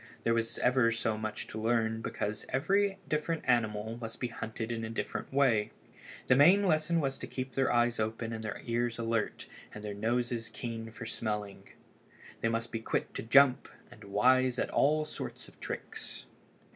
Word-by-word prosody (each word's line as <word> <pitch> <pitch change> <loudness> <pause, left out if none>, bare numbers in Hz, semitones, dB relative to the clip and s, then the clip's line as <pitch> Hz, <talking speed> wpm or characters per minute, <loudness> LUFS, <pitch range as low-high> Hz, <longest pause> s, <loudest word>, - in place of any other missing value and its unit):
There 115 - +3
was 115 0 0
ever 125 -2 +3
so 115 -1 0
much 110 0 -4
to 110 - -6
learn 115 -1 +1
because 105 -1 -3
every 195 +9 +2
different 155 +1 -1
animal 110 -2 +1
must 115 0 -6
be 125 - -2
hunted 110 0 -5
in 115 -1 -3
a 110 - -3
different 115 - -4
way. 130 -6 +3 0.6
The 125 - +5
main 175 +9 +7
lesson 165 -2 +2
was 135 -3 -1
to - - -6
keep 130 0 -5
their 135 -1 +2
eyes 120 -1 +2
open 115 +1 -2
and 110 0 -5
their 105 -2 -5
ears 120 0 0
alert 115 -1 -1 0.3
and 105 - -8
their 105 - -3
noses 115 +2 -1
keen 115 -2 -5
for 115 +1 -9
smelling. 105 -3 -4 0.7
They 115 - +2
must 115 +1 -2
be 115 - -2
quick 110 - -2
to - - -4
jump 130 +2 +5 0.2
and 110 - -13
wise 125 +5 +3
at - - -1
all 155 +2 +3
sorts - - -6
of - - -18
tricks. - - -6
115 Hz, 180 wpm, -31 LUFS, 110-130 Hz, 0.7 s, main